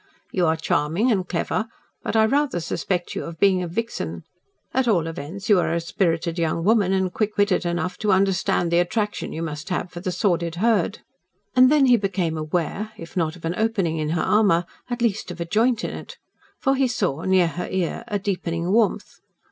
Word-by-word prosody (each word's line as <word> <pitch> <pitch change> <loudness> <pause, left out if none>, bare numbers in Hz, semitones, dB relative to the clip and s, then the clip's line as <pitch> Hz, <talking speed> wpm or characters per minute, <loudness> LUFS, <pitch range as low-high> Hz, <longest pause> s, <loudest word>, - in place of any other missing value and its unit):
"You 180 -3 +1
are 160 - +3
charming 160 - +1
and 190 -4 0
clever, 215 +5 -1 0.3
but - - -3
I 220 0 +5
rather 275 -4 +1
suspect 175 +1 -2
you - - -3
of 165 -1 -7
being 190 -2 +4
a 180 - -3
vixen. 165 - -4 0.5
At 260 -1 +1
all 180 -8 +3
events 165 +4 -6
you 205 -4 +5
are - - 0
a 170 - +1
spirited 170 -1 -1
young 165 0 0
woman 205 -1 +3
and 190 -1 0
quick 215 -1 -1
witted 205 -3 +2
enough 175 +1 -2
to 210 - +1
understand 190 -2 +2
the 170 - +4
attraction 210 +4 -1
you 165 - -4
must 150 -2 -5
have 180 -1 -2
for 175 - -7
the 185 +1 -3
sordid 175 -2 0
herd." 210 0 +1 0.5
And 255 +1 +7
then 295 -2 +5
he 245 -2 +6
became 190 -5 -1
aware 175 +7 -2
if 165 - -10
not 165 -3 0
of 170 - -10
an 165 - 0
opening 195 -7 0
in 155 -1 -1
her - - 0
armour 200 -5 +3 0.2
at 240 -1 -2
least 220 -4 0
of 180 -1 -7
a 170 - -2
joint 225 +5 +2
in - - -2
it. - - -9 0.4
For 270 - +1
he 270 -1 +2
saw, 185 - -1
near 185 0 +3
her 175 - -5
ear, 185 +4 -2
a 210 -3 -1
deepening 180 -3 -2
warmth. 220 0 +1
185 Hz, 205 wpm, -23 LUFS, 170-215 Hz, 0.5 s, And